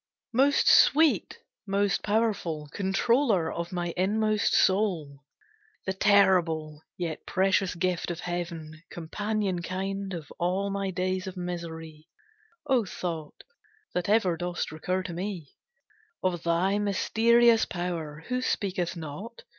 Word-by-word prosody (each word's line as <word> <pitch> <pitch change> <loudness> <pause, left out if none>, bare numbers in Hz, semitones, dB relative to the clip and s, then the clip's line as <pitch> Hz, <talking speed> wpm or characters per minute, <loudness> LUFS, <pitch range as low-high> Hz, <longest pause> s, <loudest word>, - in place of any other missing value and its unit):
Most 275 +4 +3
sweet, 315 +1 +5 0.3
most 200 0 +1
powerful, 205 -8 -1
Controller 200 - +2
of 170 0 -4
my 175 -2 -2
inmost 215 +3 +1
soul; 175 -8 +1 0.6
The 190 - -1
terrible, 175 -7 +3 0.2
yet 170 -3 -4
precious 190 0 +1
gift 175 0 -1
Of 175 0 -4
heaven, 170 -3 -5
companion 200 +2 -2
kind 195 +2 -3
Of 160 -3 -8
all 185 +3 0
my 195 0 -2
days 185 +1 -2
of 190 0 -7
misery, 165 -3 -6 0.6
O 260 -5 +3
thought, 165 -5 -6 0.5
that 180 +1 -1
ever 195 -6 +3
dost 175 -1 -3
recur 180 +4 -2
to 175 - -6
me; 175 -4 -5 0.7
Of 180 -3 0
thy 175 +5 +1
mysterious 225 +3 +4
power 165 -4 -4
Who 250 0 0
speaketh 185 -7 -1
not? 170 +9 -8
185 Hz, 120 wpm, -27 LUFS, 170-205 Hz, 0.7 s, sweet